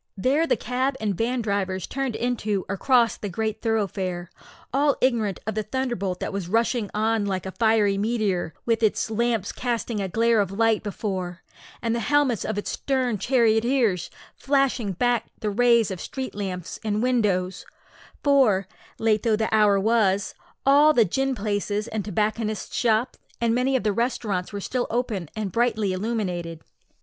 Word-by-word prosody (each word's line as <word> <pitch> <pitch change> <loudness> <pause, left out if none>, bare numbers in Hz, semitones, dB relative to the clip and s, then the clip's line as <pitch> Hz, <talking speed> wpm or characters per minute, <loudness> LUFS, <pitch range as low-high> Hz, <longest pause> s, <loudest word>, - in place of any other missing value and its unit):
There 280 +11 +2
the - - +2
cab 260 +2 -1
and 210 -2 0
van 240 +4 -1
drivers 195 -3 -1
turned 270 -4 -3
into 220 -5 -1
or 195 - -2
crossed 235 0 +2
the 205 - -3
great 215 +3 -3
thoroughfare, 190 -5 -2 0.4
all 285 +1 +3
ignorant 230 -6 +1
of 220 - -2
the 215 - -1
thunderbolt 215 -6 -2
that - - -3
was 195 -3 -4
rushing 230 0 +1
on 215 0 0
like 190 -2 -2
a 190 - -4
fiery 215 -2 +2
meteor, 205 -6 -1
with 230 -1 +1
its 220 0 +1
lamps 225 -2 0
casting 235 -3 -2
a 195 - -1
glare 230 +3 +3
of 200 -3 +1
light 225 +1 +2
before, 190 -4 -4 0.4
and 230 -1 +1
the 235 - 0
helmets 285 -3 +2
of 220 - -3
its 205 - -3
stern 255 -6 -1
charioteers 230 -4 +2 0.2
flashing 270 -7 0
back 240 +5 +1
the 210 - -2
rays 235 -1 +3
of 185 - -5
street 265 -1 -5
lamps 185 -3 -5
and 215 +1 0
windows; 195 -7 +1 0.6
for, 250 -10 +4 0.3
late 220 -1 +2
though 225 -3 +2
the 220 +1 -1
hour 210 -2 +5
was, 205 -2 +2 0.3
all 290 +3 +6
the 235 -6 +5
gin 270 +7 0
palaces, 205 0 -2
and 220 -2 -3
tobacconists' 215 +2 -2
shops, 230 +1 +1 0.2
and 235 -1 +2
many 255 +2 +1
of 260 - +1
the 210 -1 +1
restaurants 210 -5 -1
were 205 - -4
still 245 +5 -2
open 220 - -2
and 210 -3 -3
brightly 220 -4 +1
illuminated. 185 -6 -3
220 Hz, 165 wpm, -24 LUFS, 200-240 Hz, 0.6 s, all